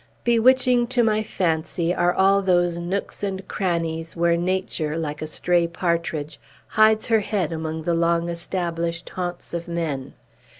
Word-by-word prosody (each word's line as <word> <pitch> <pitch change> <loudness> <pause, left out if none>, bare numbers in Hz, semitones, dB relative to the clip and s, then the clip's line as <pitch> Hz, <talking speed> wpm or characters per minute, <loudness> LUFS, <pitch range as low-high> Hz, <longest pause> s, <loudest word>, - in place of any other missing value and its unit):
Bewitching 245 +1 +4
to 245 -1 +2
my 215 -1 +2
fancy 170 -3 -1
are 175 -1 +2
all 195 +2 +3
those 175 -2 +2
nooks 180 +3 -4
and 195 -2 -3
crannies 165 -3 -2
where 170 0 +3
Nature, 175 -3 -1
like 150 -2 -4
a 155 - -3
stray 170 +2 +1
partridge, 170 -3 -2 0.3
hides 215 0 +4
her 225 -1 +3
head 200 -6 -1
among 160 0 -4
the 170 - 0
long 170 0 +1
established 170 -1 -3
haunts 175 -2 -5
of 170 0 -4
men! 160 -6 -3
170 Hz, 145 wpm, -23 LUFS, 165-195 Hz, 0.3 s, Bewitching